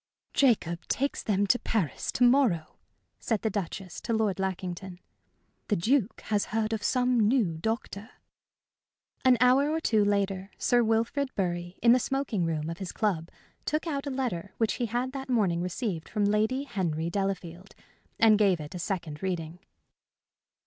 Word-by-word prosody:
"Jacob 210 - +2
takes 280 +2 -1
them 205 -1 +1
to 245 +5 +3
Paris 190 - -1
to 250 - +1
morrow," 240 - +3 0.4
said 225 -4 -1
the 220 - +1
Duchess 185 -3 -5
to 230 - -2
Lord 215 -4 +1
Lackington. 185 -1 -4 0.7
"The 210 - +2
Duke 230 +5 +1
has 210 -2 0
heard 220 0 -1
of 220 - -2
some 250 +2 +2
new 210 -7 +2
doctor." 220 +1 -3 1.1
An 255 -1 +6
hour 255 +4 +5
or 320 +1 0
two 220 -9 +2
later, 200 -1 0
Sir 240 -1 +3
Wilfrid 230 +5 +1
Bury, 175 -1 -2
in 235 - +7
the 250 - +6
smoking 250 -8 -1
room 155 -2 -2
of 165 +1 -5
his 190 -2 -5
club, 180 -7 -1 0.3
took 305 +2 -1
out 285 -3 -3
a - - 0
letter 235 -9 -3
which 225 -2 +1
he 240 - +1
had 245 +3 -2
that 270 -1 -6
morning 195 -9 +2
received 180 -2 -3
from 210 -2 0
Lady 215 +6 +1
Henry 170 - -2
Delafield 190 -2 -3 0.4
and 220 -2 +5
gave 195 -5 +3
it 150 -1 -8
a 180 - -5
second 170 -5 -4
reading. 175 -3 -3
205 Hz, 165 wpm, -28 LUFS, 180-245 Hz, 1.1 s, in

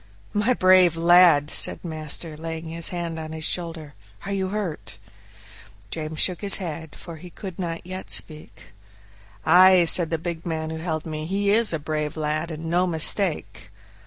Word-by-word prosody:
"My 215 +5 +1
brave 185 -3 +4
lad!" 170 -3 +5
said - - +3
master, 155 0 -5
laying 160 +1 -6
his 165 0 +1
hand 170 -2 -5
on 155 0 -7
his 160 0 -7
shoulder, 165 -4 -4 0.3
"are 200 - -4
you 190 -1 -2
hurt?" 160 - -5 0.9
James 155 -1 -5
shook 180 -3 +3
his 200 -2 +4
head, 160 -5 -7
for 170 -2 -10
he 180 +3 -12
could 185 0 -9
not 170 -2 -5
yet 185 +1 -7
speak. 155 -1 -2 0.8
"Ay," 185 -1 +6
said 165 0 +4
the 165 - -1
big 165 0 -6
man 160 -2 -4
who 160 - -5
held 160 -1 -4
me; 155 -1 -5
"he 200 +2 0
is 225 +1 +2
a 165 - 0
brave 150 0 -4
lad, 155 +2 -2
and 160 0 -7
no 175 +3 +1
mistake." 160 - 0
165 Hz, 170 wpm, -23 LUFS, 155-180 Hz, 0.9 s, Ay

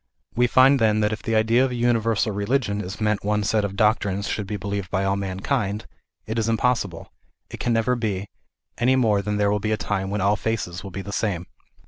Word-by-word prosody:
We 125 +1 +3
find 130 +3 +5
then 110 -1 +3
that 105 +1 +1
if 110 - -5
by - - -16
the 115 - +1
idea 115 +3 +4
of 135 - +1
a 125 - -4
universal 115 -2 +1
religion 105 0 0
is 95 +2 -7
meant 105 -1 0
one 105 +1 0
set 105 +1 +1
of 100 -1 -3
doctrines 100 -2 +1
should 105 -2 -3
be 105 - -3
believed 100 -1 -4
by 95 0 0
all 95 0 +1
man 95 -1 -4
kind, 105 -6 -1 0.4
it 110 +1 -2
is 115 0 0
impossible, 115 -6 -1 0.4
it - - -7
can 120 - 0
never 115 +2 +2
be, 105 -5 -2 0.5
any 125 +2 +3
more 110 -6 +3
than 105 +1 -2
there 100 -1 +2
will 105 - +1
be 110 +2 -2
a 110 - +1
time 95 -2 -2
when 105 +1 -2
all 100 +2 +3
faces 95 -5 -3
will 100 - -7
be 95 +1 -6
the 100 - -7
same. 90 -4 -1
105 Hz, 240 wpm, -23 LUFS, 100-115 Hz, 0.5 s, find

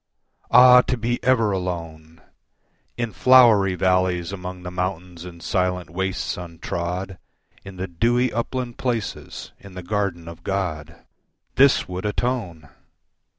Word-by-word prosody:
Ah, 125 0 +8
to 125 - -2
be 120 +2 -2
ever 115 -4 +3
alone, 85 -4 -5 0.8
In 120 -2 -2
flowery 105 -2 +5
valleys 90 -1 +1
among 90 -1 -7
the 90 - -6
mountains 90 -1 -4
and 85 -2 -11
silent 90 -1 -1
wastes 95 +1 -3
untrod, 90 +2 -5 0.4
In 100 -1 -10
the 95 +1 -4
dewy 120 +8 +1
upland 120 +1 -4
places, 120 -4 -4
in 100 -2 -14
the 90 - -7
garden 90 -3 -2
of 85 0 -10
God, 90 -6 -4 0.5
This 135 0 +4
would 90 +3 -4
atone! 105 - -3
95 Hz, 125 wpm, -22 LUFS, 90-115 Hz, 0.8 s, Ah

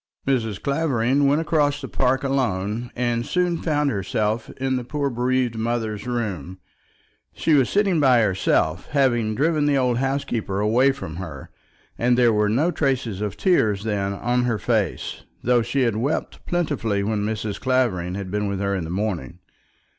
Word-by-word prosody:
Mrs. 115 -7 0
Clavering 140 -2 +1
went 145 +3 +3
across 150 -3 +1
the - - -6
park 130 +1 +1
alone, 120 -4 -1
and 120 -1 0
soon 180 +4 0
found 150 -3 +1
herself 105 +3 -1
in 130 0 0
the 125 - -2
poor 140 +2 -2
bereaved 125 0 0
mother's 110 -2 -2
room. 100 - -3 0.8
She 160 - +1
was 135 -4 +4
sitting 195 -5 +2
by 130 -4 +5
herself, 95 -4 +1
having 120 -6 +2
driven 150 +2 +2
the 145 -1 +3
old 125 -2 +1
housekeeper 125 -7 -1
away 120 +6 +3
from 110 -12 -7
her; 80 -7 -8 0.5
and 120 +1 +3
there 120 -2 +4
were 105 0 +2
no 145 +11 +2
traces 125 - -1
of 105 -2 -3
tears 110 - +2
then 100 -3 -1
on 120 +4 0
her 115 -3 0
face, 105 -6 -1 0.2
though 120 0 +3
she 120 +4 -1
had 115 -3 +1
wept 130 +8 -2
plentifully 140 -12 0
when 105 0 -1
Mrs. 105 -1 -3
Clavering 115 -9 0
had 95 -2 -5
been 105 0 -1
with 100 -1 -2
her 100 0 0
in 90 -4 -2
the - - -7
morning. 90 - -3
120 Hz, 170 wpm, -23 LUFS, 105-135 Hz, 0.8 s, by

